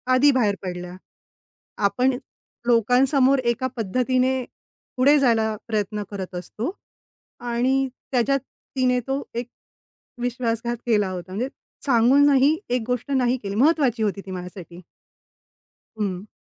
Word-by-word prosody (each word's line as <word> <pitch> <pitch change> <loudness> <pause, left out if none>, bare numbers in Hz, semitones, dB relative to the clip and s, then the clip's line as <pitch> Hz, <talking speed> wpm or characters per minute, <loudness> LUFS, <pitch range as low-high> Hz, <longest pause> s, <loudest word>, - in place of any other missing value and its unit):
आधी 285 +3 +6
बाहेर 220 -6 +2
पडल्या. 180 -1 -5 0.9
आपण 250 +5 +2 0.5
लोकांसमोर 255 +4 +4
एका 235 +2 +1
पद्धतीने 255 +4 +1 0.5
पुढे 280 +4 +5
जायला 225 -4 +2
प्रयत्न 210 -2 -2
करत 190 -2 -6
असतो 215 - -4 0.7
आणि 255 +3 +1 0.2
त्याच्यात 270 +2 +2 0.4
तिने 250 -1 +2
तो 270 +1 -1
एक 240 +1 -3 0.7
विश्वासघात 240 -1 -1
केला 210 -5 +2
होता. 185 0 -7
म्हणजे 245 +7 -2 0.4
सांगूनही 275 +4 +5
एक 245 -1 +1
गोष्ट 250 +3 -2
नाही 255 -2 +2
केली. 195 0 -4
महत्त्वाची 265 -3 +3
होती 200 -1 -1
ती 190 - -8
माझ्यासाठी. 180 -1 -8 1.2
हं. 200 -1 -3
240 Hz, 115 wpm, -23 LUFS, 210-260 Hz, 1.2 s, आधी